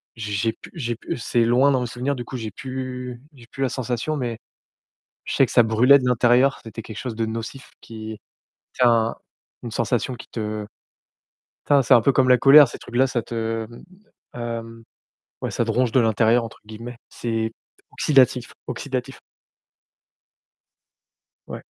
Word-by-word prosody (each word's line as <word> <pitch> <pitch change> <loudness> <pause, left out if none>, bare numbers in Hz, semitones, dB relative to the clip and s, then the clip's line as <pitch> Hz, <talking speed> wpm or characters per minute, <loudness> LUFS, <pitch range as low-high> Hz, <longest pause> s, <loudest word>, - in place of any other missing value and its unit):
j'ai 110 -2 -6
j'ai - - 0
j'ai - - -2
pu - - -14
j'ai 120 -7 -3
pu 120 - -5
c'est 120 +1 +1
loin 130 +4 +4
dans 130 -2 +1
mes 125 - -2
souvenirs, 125 +5 -2
du 120 - -5
coup, 130 +3 -7
j'ai 110 -3 -5
plus 125 +1 -6
j'ai 125 -4 -16
plus 135 - -3
la 130 - +1
sensation 125 +4 -2
mais 120 -5 -3 0.9
je - - -4
sais - - +5
que - - -9
ça 120 - +6
brûlait 125 +6 +5
de 125 - -4
l'intérieur, 125 +2 +3
c'était 115 0 -8
quelque 110 0 -10
chose 120 -1 -5
de 115 0 -1
nocif 115 +4 -6
qui, 110 -1 -8 0.6
ça 115 -2 +2 0.5
une 120 - -6
sensation 120 +3 -1
qui - - -11
te 105 -2 -4 1.0
tin 145 -1 +4
c'est 130 +1 +5
un 120 - +7
peu 140 - +3
comme 130 - +3
la 125 - +7
colère 140 +1 +8
ces - - -9
trucs-là, 125 +3 0
ça 125 -3 -2
te, 115 -1 -3
mmh, 120 - -13 0.5
hem, 115 -1 -6 0.6
ouais, - - -2
ça - - 0
te - - -1
«ronge 125 -2 +1
de 130 - +5
l'intérieur», 115 +1 +3
entre 115 - -9
guillemets. 115 +3 -9
C'est 115 -1 -2 0.4
oxydatif, 130 -4 +3 0.2
oxydatif. 125 0 -4 2.3
Ouais. - - -8
120 Hz, 175 wpm, -23 LUFS, 115-130 Hz, 2.3 s, colère